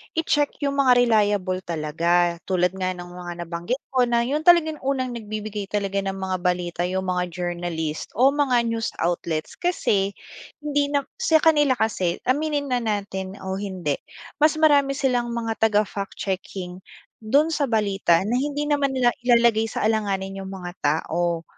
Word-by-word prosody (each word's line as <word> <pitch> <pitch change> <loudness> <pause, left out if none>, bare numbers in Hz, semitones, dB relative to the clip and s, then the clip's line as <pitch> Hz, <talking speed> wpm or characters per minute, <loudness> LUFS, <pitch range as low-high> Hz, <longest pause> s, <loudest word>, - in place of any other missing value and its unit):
i-check 295 -3 +1
yung 280 0 0
mga 265 -2 +5
reliable 205 -6 +2
talaga 170 +1 0
tulad 180 -2 +2
nga 185 -1 -3
ng 175 0 -9
mga 175 -1 -7
nabanggit 170 +10 -4
ko 255 -2 +3
na 235 0 +2
yung 295 +6 -2
talagang 315 -3 +5
unang 260 -1 -1
nagbibigay 215 -3 -5
talaga 200 -1 -1
ng 195 -1 -3
mga 190 -1 -2
balita 180 -1 -1
yung 190 +1 -2
mga 180 0 0
journalist 175 -3 -4
o 260 +4 +5
mga 270 -4 +2
news 225 -1 -2
outlets 170 -2 -2
kasi 200 - 0 0.5
hindi 290 -1 +1
na 285 -1 0 0.2
sa 315 -1 +3
kanila 295 -5 +4
kasi, 190 -7 0
aminin 290 +1 0
na 250 - +2
natin 200 -4 -3
o 190 0 -3
hindi, 185 -8 -3 0.4
mas 305 +1 +4
marami 285 -3 +4
silang 250 -4 0
mga 225 -1 +1
taga-fact 205 -2 -1
checking 185 -1 -5 0.4
dun 280 +9 +2
sa 290 -3 0
balita 200 -6 +2
na 220 +5 -1
hindi 290 +1 -2
naman 285 -2 0
nila 245 -2 +3
ilalagay 235 -2 +3
sa - - -3
alanganin 195 -3 -1
yung 190 - -6
mga 180 -2 -6
tao. 165 +3 0
210 Hz, 160 wpm, -23 LUFS, 180-265 Hz, 0.5 s, mga